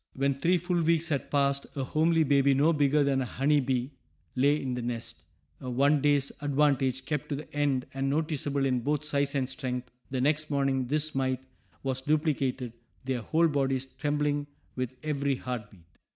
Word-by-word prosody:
When 140 Hz, +1 st, +1 dB
three 170 Hz, +7 st, +2 dB
full 175 Hz, 0 st, 0 dB
weeks 165 Hz, +1 st, +2 dB
had 145 Hz, -3 st, -1 dB
passed 140 Hz, -1 st, +1 dB
a 135 Hz, -, -2 dB
homely 160 Hz, +4 st, +2 dB
baby 140 Hz, -1 st, +4 dB
no 150 Hz, +5 st, +4 dB
bigger 145 Hz, 0 st, +3 dB
than 135 Hz, -1 st, +1 dB
a -, -, -1 dB
honey 145 Hz, +4 st, +2 dB
bee 130 Hz, 0 st, -1 dB, 0.4 s
lay 140 Hz, +3 st, +3 dB
in 130 Hz, -3 st, -3 dB
the 125 Hz, -, -3 dB
nest, 120 Hz, -1 st, -5 dB, 0.4 s
a 130 Hz, -, -6 dB
one 140 Hz, +4 st, +3 dB
day's 145 Hz, -1 st, +2 dB
advantage 135 Hz, -3 st, +1 dB
kept 150 Hz, 0 st, -3 dB
to 145 Hz, -, -1 dB
the 145 Hz, 0 st, -9 dB
end, 140 Hz, -3 st, +1 dB
and 135 Hz, 0 st, -1 dB
noticeable 145 Hz, -2 st, 0 dB
in 130 Hz, -2 st, +1 dB
both 145 Hz, +4 st, -1 dB
size 140 Hz, -1 st, 0 dB
and 130 Hz, -2 st, +1 dB
strength. 125 Hz, -1 st, -4 dB, 0.2 s
The 130 Hz, -, -2 dB
next 150 Hz, +3 st, +1 dB
morning 135 Hz, -3 st, +1 dB
this 155 Hz, +3 st, +1 dB
mite 130 Hz, -1 st, 0 dB, 0.4 s
was 130 Hz, -1 st, -1 dB
duplicated, 135 Hz, -5 st, 0 dB, 0.3 s
their 130 Hz, -2 st, -1 dB
whole 165 Hz, +8 st, +2 dB
bodies 135 Hz, -3 st, 0 dB
trembling 145 Hz, +1 st, -1 dB, 0.3 s
with 130 Hz, 0 st, -3 dB
every 140 Hz, -2 st, 0 dB
heart 125 Hz, -4 st, -5 dB
beat. 90 Hz, -5 st, -19 dB
140 Hz, 180 wpm, -29 LUFS, 130-150 Hz, 0.4 s, baby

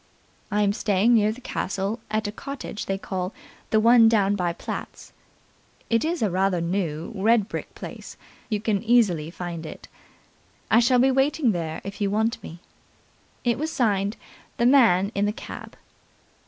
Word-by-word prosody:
"I 210 Hz, 0 st, +1 dB
am 200 Hz, 0 st, +2 dB
staying 210 Hz, +2 st, +2 dB
near 215 Hz, -2 st, +4 dB
the 240 Hz, +4 st, -9 dB
castle 200 Hz, -3 st, -3 dB
at 215 Hz, +1 st, -1 dB
a -, -, -3 dB
cottage 275 Hz, -2 st, -7 dB
they 195 Hz, -, -1 dB
call 185 Hz, 0 st, -4 dB, 0.4 s
'the 220 Hz, -, +3 dB
one 230 Hz, 0 st, +7 dB
down 205 Hz, -3 st, +2 dB
by 180 Hz, -3 st, 0 dB
Platt's'. 170 Hz, -, -7 dB, 0.8 s
It 230 Hz, +3 st, +3 dB
is 330 Hz, -3 st, -1 dB
a 205 Hz, -, +1 dB
rather 190 Hz, 0 st, +1 dB
new, 170 Hz, -1 st, -2 dB
red 215 Hz, +1 st, +2 dB
brick -, -, -6 dB
place. -, -, -9 dB, 0.3 s
You 210 Hz, -3 st, -1 dB
can 215 Hz, -3 st, 0 dB
easily 210 Hz, -10 st, +2 dB
find 170 Hz, -1 st, -6 dB
it. 155 Hz, -, -9 dB, 0.8 s
I 225 Hz, -, +7 dB
shall 250 Hz, +1 st, +4 dB
be 265 Hz, +2 st, +4 dB
waiting 270 Hz, -1 st, +2 dB
there 165 Hz, -4 st, -4 dB
if 200 Hz, +1 st, -8 dB
you 200 Hz, -, +2 dB
want 220 Hz, +3 st, 0 dB
me." 170 Hz, +2 st, -10 dB, 0.8 s
It 240 Hz, 0 st, +1 dB
was 315 Hz, +2 st, -2 dB
signed 205 Hz, -5 st, 0 dB, 0.4 s
"The 235 Hz, -, +2 dB
Man 225 Hz, -7 st, +5 dB
in 200 Hz, +1 st, +1 dB
the -, -, +1 dB
Cab". -, -, -9 dB
210 Hz, 170 wpm, -24 LUFS, 190-235 Hz, 0.8 s, one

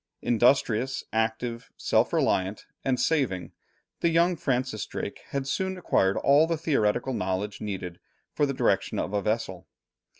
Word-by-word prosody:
Industrious, 120 Hz, +1 st, +2 dB
active, 115 Hz, +2 st, -1 dB
self -, -, +2 dB
reliant, 95 Hz, +2 st, 0 dB, 0.2 s
and 130 Hz, -2 st, +1 dB
saving, 125 Hz, -, 0 dB, 0.5 s
the 170 Hz, -, +2 dB
young 170 Hz, +2 st, +3 dB
Francis 130 Hz, -, -1 dB
Drake -, -, -5 dB
had 140 Hz, -1 st, -3 dB
soon 190 Hz, +6 st, -1 dB
acquired 95 Hz, -, +2 dB
all 145 Hz, +3 st, +5 dB
the 165 Hz, -1 st, 0 dB
theoretical 130 Hz, -5 st, +1 dB
knowledge 95 Hz, 0 st, -2 dB
needed 95 Hz, -4 st, -5 dB, 0.3 s
for 145 Hz, -, +2 dB
the -, -, -1 dB
direction 120 Hz, -7 st, +1 dB
of 95 Hz, -, -2 dB
a 100 Hz, -, +1 dB
vessel. 105 Hz, -4 st, -2 dB
120 Hz, 140 wpm, -27 LUFS, 105-140 Hz, 0.5 s, all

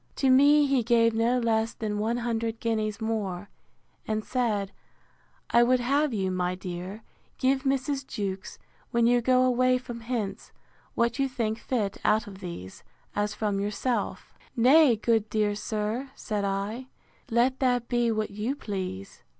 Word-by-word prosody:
To 265 Hz, -2 st, +3 dB
me 290 Hz, +3 st, +6 dB
he 270 Hz, -2 st, +2 dB
gave 230 Hz, 0 st, +3 dB
no 230 Hz, +3 st, +2 dB
less 225 Hz, -1 st, 0 dB
than 210 Hz, -2 st, -3 dB
one 225 Hz, +3 st, 0 dB
hundred 230 Hz, -1 st, -2 dB
guineas 215 Hz, -3 st, -1 dB
more; 205 Hz, -4 st, -3 dB, 0.6 s
and 215 Hz, 0 st, -2 dB
said, 215 Hz, -6 st, -1 dB, 0.8 s
I 235 Hz, -, +6 dB
would 250 Hz, +1 st, +4 dB
have 280 Hz, +4 st, +1 dB
you, 190 Hz, -4 st, -1 dB
my 180 Hz, 0 st, -1 dB
dear, 185 Hz, +3 st, -7 dB, 0.3 s
give 265 Hz, +1 st, +2 dB
Mrs. 270 Hz, 0 st, -1 dB
Jewkes, 195 Hz, -2 st, -4 dB, 0.3 s
when 235 Hz, 0 st, +2 dB
you 240 Hz, +1 st, +4 dB
go 255 Hz, +1 st, +4 dB
away 255 Hz, 0 st, +3 dB
from 240 Hz, -2 st, -7 dB
hence, 225 Hz, -4 st, -4 dB, 0.4 s
what 235 Hz, +2 st, +1 dB
you 270 Hz, 0 st, +1 dB
think 230 Hz, -4 st, -2 dB
fit 215 Hz, -6 st, -2 dB
out 215 Hz, +2 st, +3 dB
of 195 Hz, -3 st, -10 dB
these, 170 Hz, -, -8 dB, 0.3 s
as 205 Hz, 0 st, -1 dB
from 205 Hz, -2 st, -1 dB
yourself.—Nay, 245 Hz, +5 st, +2 dB
good 220 Hz, 0 st, +1 dB
dear 210 Hz, -1 st, +1 dB
sir, 215 Hz, +5 st, -3 dB
said 210 Hz, -2 st, -3 dB
I, 200 Hz, +6 st, -3 dB, 0.4 s
let 245 Hz, +3 st, +2 dB
that 245 Hz, -2 st, +1 dB
be 240 Hz, -1 st, +1 dB
what 215 Hz, -1 st, -2 dB
you 215 Hz, +7 st, -2 dB
please. 190 Hz, -, -6 dB
225 Hz, 150 wpm, -27 LUFS, 205-250 Hz, 0.8 s, me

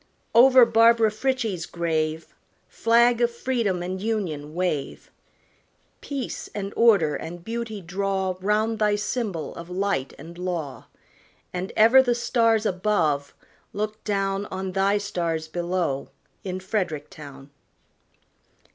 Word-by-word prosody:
Over 255 Hz, +1 st, +8 dB
Barbara 230 Hz, -1 st, +4 dB
Frietchie's 225 Hz, -6 st, -2 dB
grave, 160 Hz, -1 st, -2 dB, 0.3 s
Flag 235 Hz, +1 st, +3 dB
of 240 Hz, -, +4 dB
freedom 235 Hz, -7 st, -1 dB
and 185 Hz, +1 st, -4 dB
Union 170 Hz, -9 st, -3 dB
wave! 175 Hz, -6 st, -3 dB, 0.9 s
Peace 275 Hz, -3 st, -5 dB
and 200 Hz, -1 st, -4 dB
order 200 Hz, -10 st, +4 dB
and 170 Hz, +1 st, -7 dB
beauty 225 Hz, -2 st, -4 dB
draw 190 Hz, +1 st, -2 dB
Round 215 Hz, +3 st, +1 dB
thy 210 Hz, -1 st, +3 dB
symbol 210 Hz, -5 st, -3 dB
of 170 Hz, +1 st, -9 dB
light 185 Hz, -7 st, -2 dB
and 170 Hz, +4 st, -11 dB
law; 170 Hz, -6 st, -4 dB, 0.7 s
And 180 Hz, +2 st, -4 dB
ever 230 Hz, +5 st, +7 dB
the 245 Hz, -2 st, +1 dB
stars 230 Hz, -2 st, +2 dB
above 180 Hz, -8 st, 0 dB, 0.4 s
look 215 Hz, +1 st, -4 dB
down 195 Hz, -1 st, -1 dB
On 190 Hz, 0 st, -4 dB
thy 195 Hz, +2 st, +2 dB
stars 170 Hz, -5 st, -2 dB
below 170 Hz, -4 st, -2 dB, 0.3 s
in 185 Hz, -1 st, -4 dB
Frederick 185 Hz, -6 st, -3 dB
town. 140 Hz, -2 st, -12 dB
195 Hz, 120 wpm, -24 LUFS, 170-225 Hz, 0.9 s, Over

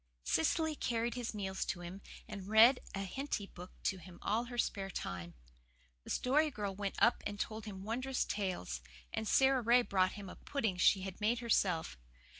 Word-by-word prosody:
Cecily 310 Hz, -, +2 dB
carried 235 Hz, -3 st, -1 dB
his 240 Hz, -3 st, -4 dB
meals 190 Hz, -2 st, -2 dB
to 175 Hz, -, -3 dB
him, 180 Hz, +3 st, -7 dB, 0.3 s
and 200 Hz, -3 st, -7 dB
read 225 Hz, +5 st, +7 dB, 0.2 s
a 195 Hz, -, -2 dB
Henty 240 Hz, +1 st, -3 dB
book 180 Hz, -1 st, -11 dB
to 190 Hz, -, 0 dB
him 175 Hz, +1 st, -12 dB
all 225 Hz, +3 st, +1 dB
her 240 Hz, 0 st, -7 dB
spare 195 Hz, -4 st, -1 dB
time. 90 Hz, -, -5 dB, 0.7 s
The -, -, -10 dB
Story 300 Hz, +5 st, +3 dB
Girl 210 Hz, -7 st, -3 dB
went 200 Hz, 0 st, -3 dB
up 235 Hz, -, +4 dB
and 205 Hz, -1 st, -6 dB
told 220 Hz, 0 st, -3 dB
him 195 Hz, -3 st, -7 dB
wondrous 255 Hz, +5 st, -1 dB
tales; 180 Hz, -, -2 dB, 0.3 s
and 220 Hz, -, -2 dB
Sara 265 Hz, +1 st, +4 dB
Ray 240 Hz, +2 st, +5 dB
brought 185 Hz, -4 st, +2 dB
him 205 Hz, -2 st, -8 dB
a -, -, -8 dB
pudding 220 Hz, -10 st, -1 dB
she 190 Hz, +1 st, +5 dB
had 190 Hz, +1 st, -6 dB
made 225 Hz, +3 st, +2 dB
herself. 185 Hz, -, +1 dB
210 Hz, 185 wpm, -35 LUFS, 190-240 Hz, 0.7 s, read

